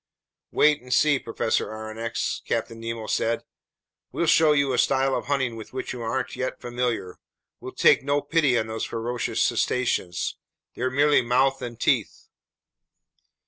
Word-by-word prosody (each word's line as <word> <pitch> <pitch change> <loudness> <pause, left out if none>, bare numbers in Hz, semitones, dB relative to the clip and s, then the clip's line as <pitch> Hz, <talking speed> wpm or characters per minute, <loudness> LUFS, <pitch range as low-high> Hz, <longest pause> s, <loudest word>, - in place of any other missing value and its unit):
"Wait 150 -1 +3
and 125 0 -12
see, 145 -2 +4
Professor 115 -1 -1
Aronnax," 110 +1 -4
Captain 115 - -2
Nemo 115 -1 -5
said. 115 +2 0 0.7
"We'll 170 - -1
show 160 -1 +5
you 140 -2 +2
a - - +1
style 135 0 +2
of - - -2
hunting 135 -4 0
with 110 +1 -10
which 130 - -4
you 125 - -7
aren't 115 +1 -2
yet 130 0 -3
familiar. 120 -6 -3 0.4
We'll - - -8
take - - +5
no 145 +1 +1
pity 145 -5 +2
on 110 - 0
these 110 0 -4
ferocious 120 +1 -2
cetaceans. 95 -9 0 0.4
They're 130 +1 -1
merely 145 +3 +4
mouth 130 +3 +2
and 120 -2 -6
teeth!" - - 0
125 Hz, 150 wpm, -25 LUFS, 115-135 Hz, 0.7 s, show